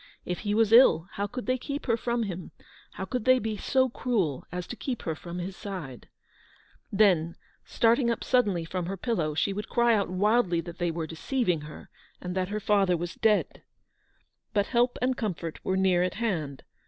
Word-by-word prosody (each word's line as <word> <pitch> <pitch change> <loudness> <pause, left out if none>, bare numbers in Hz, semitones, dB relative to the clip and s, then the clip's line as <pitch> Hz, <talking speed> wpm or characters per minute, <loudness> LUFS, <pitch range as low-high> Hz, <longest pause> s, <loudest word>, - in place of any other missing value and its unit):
If 180 - -3
he 205 -1 -1
was 225 0 +3
ill, 230 -8 +7
how 200 +1 -2
could 245 +4 -6
they 255 0 0
keep 285 +3 -5
her 230 - +2
from 235 +1 -1
him, 185 -4 -5 0.4
how 190 - -5
could 250 +3 -3
they 255 0 +6
be 220 -3 -2
so 260 +5 +2
cruel 210 - -1
as 180 0 -4
to 245 - -7
keep 250 -1 -4
her 160 - -1
from 170 +2 -8
his 180 +2 -5
side? 175 - -7 0.8
Then, 180 -5 +3 0.3
starting 235 +2 +2
up 230 - -1
suddenly 205 -10 +2
from 180 +1 -3
her 195 +1 -4
pillow, 170 -9 -1
she 195 +5 +1
would 210 +2 -5
cry 235 -1 +3
out 205 -4 +1
wildly 190 -1 +2
that 170 +1 -10
they 175 -1 +1
were 165 -1 -3
deceiving 175 - -1
her, 150 0 -11 0.3
and 180 0 -5
that 185 0 -1
her 210 +1 -2
father 195 -4 +2
was 170 +1 -4
dead. 215 -2 +1 0.9
But 205 -1 +3
help 245 +1 +1
and 255 0 +2
comfort 175 -8 -4
were 190 - 0
near 185 -2 +3
at 180 - 0
hand. 165 - -2
200 Hz, 195 wpm, -28 LUFS, 175-235 Hz, 0.9 s, ill